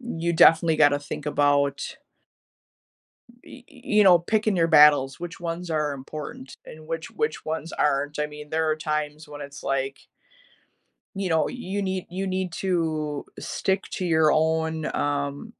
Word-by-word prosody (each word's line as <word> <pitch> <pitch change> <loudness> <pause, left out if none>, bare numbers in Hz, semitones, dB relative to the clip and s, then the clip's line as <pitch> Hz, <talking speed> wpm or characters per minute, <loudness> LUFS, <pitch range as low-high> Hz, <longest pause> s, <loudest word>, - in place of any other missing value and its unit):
you 170 -9 -2
definitely 165 0 +5
gotta 145 -2 +4
think 145 0 -7
about 145 -1 +1 1.5
y 255 - -13
y 260 -4 -18
you 210 -6 +3
know, 180 -3 +7
picking 215 +3 0
your 165 -2 +3
battles, 150 -4 +5
which 175 -1 -7
ones 170 +1 -5
are 150 -2 0
important 135 -1 -8
and 155 0 -12
which 165 0 -4
which 450 0 -2
ones 160 +1 -4
aren't, 145 +1 0
I 150 - +1
mean, 150 0 -11
there 160 0 0
are 155 - +1
times 150 0 -3
when 145 0 -9
it's 140 0 -9
like 135 0 -3 1.1
you 195 -2 -2
know, 160 -1 +2
you 205 -5 -4
need 190 -1 -2
you 190 +2 -3
need 185 -1 -2
to 160 -5 -2
stick 190 0 -1
to 185 - -3
your 160 -2 +4
own, 160 0 0
um 145 - -2
160 Hz, 160 wpm, -25 LUFS, 145-175 Hz, 1.5 s, know